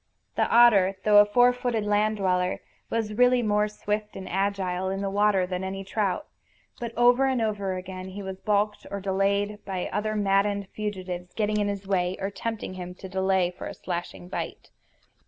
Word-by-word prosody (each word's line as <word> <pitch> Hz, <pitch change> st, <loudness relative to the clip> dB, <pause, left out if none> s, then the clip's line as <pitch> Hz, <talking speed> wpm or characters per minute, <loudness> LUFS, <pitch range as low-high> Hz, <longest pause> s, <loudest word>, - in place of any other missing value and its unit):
The -, -, +1 dB
otter, 205 Hz, -5 st, +6 dB
though 210 Hz, -1 st, +7 dB
a 205 Hz, -, +8 dB
four 245 Hz, +4 st, +4 dB
footed 245 Hz, -3 st, -1 dB
land 210 Hz, +1 st, +2 dB
dweller, 180 Hz, -2 st, 0 dB, 0.3 s
was 225 Hz, -2 st, -1 dB
really 250 Hz, +2 st, +4 dB
more 210 Hz, -1 st, +2 dB
swift 210 Hz, 0 st, -3 dB
and 190 Hz, -1 st, -7 dB
agile 190 Hz, -1 st, -1 dB
in 195 Hz, +1 st, -2 dB
the 195 Hz, -1 st, -2 dB
water 205 Hz, -2 st, +3 dB
than 180 Hz, 0 st, -4 dB
any 195 Hz, +1 st, -4 dB
trout; 195 Hz, +4 st, -1 dB, 0.5 s
but 235 Hz, -1 st, -4 dB
over 245 Hz, +2 st, +5 dB
and 260 Hz, -2 st, +1 dB
over 205 Hz, -4 st, -1 dB
again 185 Hz, 0 st, -7 dB
he 195 Hz, +2 st, -7 dB
was 190 Hz, 0 st, -6 dB
balked 210 Hz, 0 st, 0 dB
or 200 Hz, -, -4 dB
delayed 200 Hz, +2 st, 0 dB
by 185 Hz, -2 st, -4 dB
other 215 Hz, +2 st, -1 dB
maddened 200 Hz, -1 st, +1 dB
fugitives 185 Hz, -4 st, -5 dB
getting 210 Hz, -1 st, 0 dB
in 205 Hz, -, +1 dB
his 200 Hz, -1 st, -4 dB
way, 185 Hz, -1 st, 0 dB
or 195 Hz, +1 st, -2 dB
tempting 225 Hz, -2 st, -4 dB
him 180 Hz, -1 st, -7 dB
to 190 Hz, -, -9 dB
delay 190 Hz, -1 st, +1 dB
for 180 Hz, -, -8 dB
a -, -, -7 dB
slashing 175 Hz, 0 st, -5 dB
bite. 185 Hz, -, -6 dB
200 Hz, 185 wpm, -26 LUFS, 190-210 Hz, 0.5 s, a